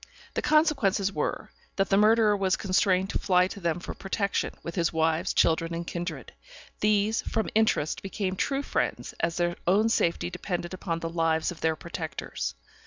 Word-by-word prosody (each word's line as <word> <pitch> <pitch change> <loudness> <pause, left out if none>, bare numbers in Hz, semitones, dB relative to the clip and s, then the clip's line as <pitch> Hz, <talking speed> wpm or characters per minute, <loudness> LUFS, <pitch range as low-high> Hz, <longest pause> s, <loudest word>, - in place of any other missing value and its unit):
The - - -1
consequences 235 - +2
were, - - -3 0.2
that 195 -1 +1
the - - +5
murderer 215 +1 +5
was 190 -2 +1
constrained 190 0 +2
to - - -1
fly 180 -1 +3
to 200 - -8
them 170 -2 -1
for - - -6
protection, 200 +1 -1
with 170 - -5
his 170 -3 +1
wives, 160 +2 +1
children, 165 +1 +2
and 170 +1 -4
kindred. 170 0 -5 0.5
These, 210 +1 +2
from 220 - -2
interest, 215 -8 +1
became 195 -1 -3
true 275 +8 -1
friends, - - -2
as 165 0 -1
their 175 0 0
own 210 +5 +4
safety 175 -5 +1
depended 175 0 -4
upon 170 -3 -3
the 165 - -3
lives 165 -1 +1
of 175 - -10
their 160 -1 +2
protectors. 165 0 -5
185 Hz, 175 wpm, -27 LUFS, 170-205 Hz, 0.5 s, the